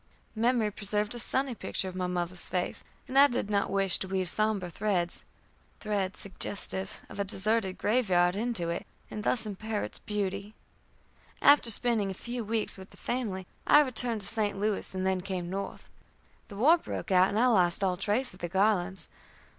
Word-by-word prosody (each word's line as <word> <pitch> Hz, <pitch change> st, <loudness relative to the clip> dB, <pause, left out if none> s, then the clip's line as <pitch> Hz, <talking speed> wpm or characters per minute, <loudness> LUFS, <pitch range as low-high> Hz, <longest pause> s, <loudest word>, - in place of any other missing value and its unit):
Memory 230 Hz, -1 st, +1 dB
preserved 210 Hz, +1 st, +1 dB
a 240 Hz, -, -5 dB
sunny 265 Hz, +2 st, 0 dB
picture 195 Hz, -, -2 dB
of 185 Hz, -, -6 dB
my 185 Hz, -1 st, -1 dB
mother's 180 Hz, 0 st, -2 dB
face, 180 Hz, -1 st, -2 dB, 0.2 s
and 265 Hz, +1 st, +3 dB
I 285 Hz, -, +9 dB
did 240 Hz, -5 st, -3 dB
not 200 Hz, -1 st, +1 dB
wish 195 Hz, -2 st, +3 dB
to 190 Hz, -, -4 dB
weave 185 Hz, -2 st, 0 dB
sombre 215 Hz, -4 st, 0 dB
threads 180 Hz, -3 st, -1 dB, 0.5 s
threads 200 Hz, -3 st, -2 dB
suggestive 195 Hz, -1 st, -4 dB
of -, -, -10 dB
a -, -, +2 dB
deserted 200 Hz, 0 st, +2 dB
grave 225 Hz, 0 st, +1 dB
yard 175 Hz, 0 st, +3 dB
into 215 Hz, -6 st, -1 dB
it, 170 Hz, -, -5 dB, 0.2 s
and 210 Hz, -, -5 dB
thus 230 Hz, -1 st, +1 dB
impair 215 Hz, +1 st, -3 dB
its -, -, -7 dB
beauty. 205 Hz, 0 st, -4 dB, 0.8 s
After 285 Hz, -5 st, +5 dB
spending 225 Hz, -2 st, +2 dB
a 190 Hz, -, -5 dB
few 240 Hz, +4 st, -5 dB
weeks 220 Hz, -2 st, -2 dB
with 190 Hz, -, -11 dB
the -, -, -18 dB
family, 210 Hz, -7 st, -3 dB, 0.2 s
I 295 Hz, -, +8 dB
returned 245 Hz, -5 st, -1 dB
to 200 Hz, -, -4 dB
St. 210 Hz, -2 st, -1 dB
Louis, 205 Hz, -1 st, -2 dB
and 185 Hz, 0 st, -2 dB
then 190 Hz, -1 st, +1 dB
came 180 Hz, -2 st, -4 dB
North. 195 Hz, +1 st, -5 dB, 0.6 s
The 205 Hz, -, -10 dB
war 310 Hz, +10 st, +5 dB
broke 220 Hz, -, -6 dB
out, 185 Hz, 0 st, +5 dB
and 205 Hz, -, -2 dB
I 245 Hz, -, +4 dB
lost 190 Hz, -6 st, +4 dB
all 185 Hz, -2 st, +2 dB
trace 210 Hz, +7 st, +1 dB
of 180 Hz, -, -15 dB
the 175 Hz, -, -4 dB
Garlands. 190 Hz, -2 st, +1 dB
200 Hz, 185 wpm, -29 LUFS, 185-225 Hz, 0.8 s, I